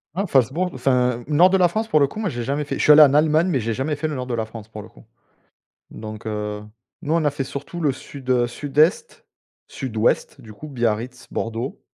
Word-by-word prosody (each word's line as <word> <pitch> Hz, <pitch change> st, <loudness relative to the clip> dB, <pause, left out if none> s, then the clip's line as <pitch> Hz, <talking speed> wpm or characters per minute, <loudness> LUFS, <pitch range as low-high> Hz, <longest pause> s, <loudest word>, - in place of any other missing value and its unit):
Oh 200 Hz, +3 st, -1 dB
Falzbourg 140 Hz, +5 st, +1 dB
enfin 125 Hz, -2 st, 0 dB
nord 160 Hz, +5 st, +5 dB
de 190 Hz, -, +3 dB
la 180 Hz, -1 st, +5 dB
France 220 Hz, +6 st, -2 dB
pour 155 Hz, -, +3 dB
le 140 Hz, -, +4 dB
coup, 215 Hz, -, -9 dB
moi 210 Hz, -3 st, -1 dB
j'ai 120 Hz, -5 st, -4 dB
jamais 140 Hz, +4 st, -2 dB
fait -, -, -4 dB
je -, -, -1 dB
suis -, -, +6 dB
allé 150 Hz, +1 st, +9 dB
en 140 Hz, -2 st, +7 dB
Allemagne, 155 Hz, +3 st, +3 dB
mais 165 Hz, -8 st, +1 dB
j'ai 115 Hz, 0 st, -2 dB
jamais 135 Hz, +6 st, -2 dB
fait 150 Hz, +2 st, -3 dB
le 155 Hz, -, -4 dB
nord 125 Hz, -1 st, -5 dB
de 125 Hz, -, -2 dB
la 110 Hz, -1 st, -2 dB
France 110 Hz, -1 st, -11 dB
pour 105 Hz, -2 st, -9 dB
le -, -, -13 dB
coup. -, -, -19 dB, 0.9 s
Donc 110 Hz, 0 st, -9 dB
heu, 105 Hz, -1 st, -4 dB, 0.4 s
nous, 155 Hz, -2 st, -2 dB
on 165 Hz, -2 st, +1 dB
a -, -, +4 dB
fait 140 Hz, -1 st, -4 dB
surtout 140 Hz, +6 st, -7 dB
le 150 Hz, -3 st, +2 dB
sud, 130 Hz, 0 st, -10 dB
heu, 125 Hz, -1 st, +3 dB
sud-est. 150 Hz, -, 0 dB, 0.4 s
Sud-ouest 115 Hz, -4 st, -1 dB
du 110 Hz, -1 st, -12 dB
coup, 150 Hz, +9 st, -10 dB
Biarritz, 120 Hz, -1 st, -2 dB
Bordeaux 115 Hz, +4 st, -4 dB
135 Hz, 235 wpm, -22 LUFS, 115-155 Hz, 0.9 s, allé